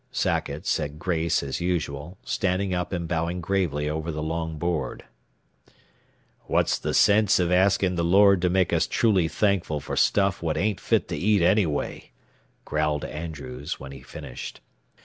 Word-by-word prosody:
Sackett -, -, -1 dB
said 75 Hz, +1 st, -1 dB
grace 85 Hz, -3 st, 0 dB
as 70 Hz, +4 st, -4 dB
usual, 85 Hz, -1 st, -3 dB
standing 95 Hz, 0 st, 0 dB
up 90 Hz, 0 st, -2 dB
and 85 Hz, -3 st, -3 dB
bowing 85 Hz, +2 st, -1 dB
gravely 85 Hz, -5 st, -1 dB
over 80 Hz, +2 st, -2 dB
the 75 Hz, 0 st, -4 dB
long 80 Hz, 0 st, -3 dB
board. 80 Hz, -3 st, -2 dB, 1.4 s
"What's -, -, +1 dB
the -, -, -2 dB
sense 105 Hz, 0 st, +5 dB
of 90 Hz, -1 st, +1 dB
asking 95 Hz, 0 st, +3 dB
the 85 Hz, -, +1 dB
Lord 100 Hz, +2 st, +5 dB
to 90 Hz, -, +2 dB
make 90 Hz, -1 st, +2 dB
us 85 Hz, -, +2 dB
truly 105 Hz, -8 st, +2 dB
thankful 90 Hz, -3 st, 0 dB
for -, -, -5 dB
stuff 100 Hz, -1 st, +2 dB
what 80 Hz, -2 st, -1 dB
ain't 100 Hz, -1 st, 0 dB
fit -, -, +1 dB
to -, -, -2 dB
eat 105 Hz, -1 st, +2 dB
anyway," 90 Hz, -5 st, +1 dB, 0.6 s
growled 75 Hz, -1 st, -1 dB
Andrews, 75 Hz, -4 st, -6 dB
when 65 Hz, 0 st, -9 dB
he 70 Hz, -2 st, -10 dB
finished. -, -, -8 dB
85 Hz, 155 wpm, -25 LUFS, 75-95 Hz, 1.4 s, sense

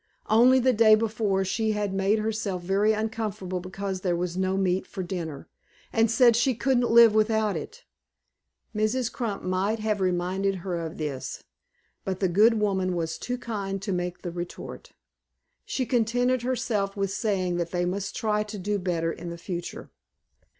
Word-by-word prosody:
Only 245 Hz, +4 st, +6 dB
the 255 Hz, 0 st, +3 dB
day 215 Hz, -1 st, +6 dB
before 215 Hz, -3 st, 0 dB
she 220 Hz, +3 st, 0 dB
had 205 Hz, -2 st, -2 dB
made 195 Hz, +2 st, +2 dB
herself 215 Hz, -4 st, -2 dB
very 200 Hz, +4 st, +2 dB
uncomfortable 215 Hz, -4 st, -2 dB
because 190 Hz, +1 st, -5 dB
there 180 Hz, -2 st, 0 dB
was 175 Hz, 0 st, -2 dB
no 190 Hz, +1 st, 0 dB
meat 185 Hz, -1 st, 0 dB
for 190 Hz, -, -5 dB
dinner, 170 Hz, -6 st, -5 dB, 0.5 s
and 225 Hz, 0 st, +3 dB
said 235 Hz, +1 st, +5 dB
she 245 Hz, +2 st, +2 dB
couldn't 245 Hz, 0 st, +1 dB
live 230 Hz, -1 st, +7 dB
without 215 Hz, -1 st, +2 dB
it. 475 Hz, +2 st, -7 dB, 0.9 s
Mrs. 220 Hz, +3 st, 0 dB
Crump 225 Hz, -6 st, -3 dB
might 185 Hz, +4 st, 0 dB
have 215 Hz, -2 st, -1 dB
reminded 185 Hz, +2 st, 0 dB
her 180 Hz, -2 st, -1 dB
of 165 Hz, -1 st, -5 dB
this, 145 Hz, -4 st, -5 dB, 0.6 s
but 190 Hz, -1 st, -3 dB
the 190 Hz, -, +2 dB
good 210 Hz, +6 st, +5 dB
woman 190 Hz, -3 st, 0 dB
was 165 Hz, -1 st, -3 dB
too 250 Hz, 0 st, -3 dB
kind 200 Hz, -5 st, -4 dB
to 200 Hz, -, -2 dB
make 180 Hz, -1 st, -3 dB
the 175 Hz, -, -4 dB
retort. 175 Hz, 0 st, -7 dB, 0.7 s
She 260 Hz, -, -2 dB
contented 245 Hz, +1 st, +1 dB
herself 215 Hz, -5 st, -1 dB
with 195 Hz, -1 st, -1 dB
saying 190 Hz, -4 st, -1 dB
that 170 Hz, -1 st, -2 dB
they 175 Hz, 0 st, -1 dB
must 195 Hz, +2 st, -3 dB
try 210 Hz, -2 st, 0 dB
to 210 Hz, 0 st, -5 dB
do 205 Hz, +2 st, -1 dB
better 170 Hz, -3 st, -1 dB
in 170 Hz, 0 st, -7 dB
future. 175 Hz, 0 st, -6 dB
200 Hz, 165 wpm, -26 LUFS, 185-220 Hz, 0.9 s, live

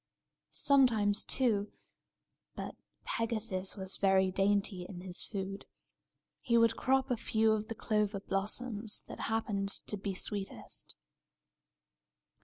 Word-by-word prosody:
Sometimes, 225 Hz, -7 st, +3 dB
too 215 Hz, -6 st, +1 dB, 0.8 s
(but -, -, -5 dB, 0.3 s
Pegasus 215 Hz, -4 st, -1 dB
was 190 Hz, 0 st, -1 dB
very 190 Hz, -1 st, +3 dB
dainty 195 Hz, -1 st, +1 dB
in 180 Hz, -3 st, -7 dB
his 180 Hz, -1 st, +3 dB
food), 195 Hz, -1 st, -5 dB, 0.7 s
he 235 Hz, -1 st, +2 dB
would 230 Hz, 0 st, +4 dB
crop 265 Hz, 0 st, +1 dB
a -, -, +3 dB
few 220 Hz, 0 st, +2 dB
of 215 Hz, 0 st, 0 dB
the 225 Hz, -, -5 dB
clover 210 Hz, -2 st, 0 dB
blossoms 210 Hz, +3 st, -2 dB
that -, -, -9 dB
happened 210 Hz, -3 st, 0 dB, 0.2 s
to 210 Hz, -, -3 dB
be 195 Hz, -1 st, -4 dB
sweetest. 200 Hz, +1 st, -3 dB
205 Hz, 115 wpm, -33 LUFS, 195-225 Hz, 0.8 s, would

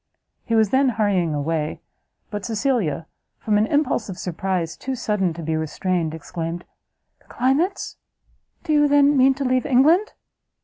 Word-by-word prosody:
He 230 Hz, -, 0 dB
was 220 Hz, -3 st, +3 dB
then 265 Hz, 0 st, +4 dB
hurrying 200 Hz, -8 st, 0 dB
away, 150 Hz, +1 st, -2 dB, 0.5 s
but 205 Hz, -1 st, -4 dB
Cecilia, 220 Hz, -, -1 dB, 0.3 s
from 210 Hz, -1 st, +1 dB
an 215 Hz, -, +2 dB
impulse 280 Hz, -7 st, 0 dB
of 185 Hz, -, -6 dB
surprise 180 Hz, -2 st, -3 dB
too 265 Hz, 0 st, -4 dB
sudden 210 Hz, -6 st, 0 dB
to 170 Hz, -, -7 dB
be 160 Hz, +1 st, -1 dB
restrained, 160 Hz, +1 st, -2 dB
exclaimed 165 Hz, +1 st, -5 dB, 0.5 s
"The -, -, -30 dB
climates? 280 Hz, +10 st, 0 dB, 0.7 s
do 310 Hz, -, -1 dB
you, 295 Hz, -1 st, +4 dB
then, 290 Hz, 0 st, +4 dB
mean 265 Hz, 0 st, +5 dB
to 280 Hz, 0 st, -3 dB
leave 255 Hz, 0 st, +2 dB
England?" 315 Hz, -, +4 dB
215 Hz, 150 wpm, -22 LUFS, 170-265 Hz, 0.7 s, mean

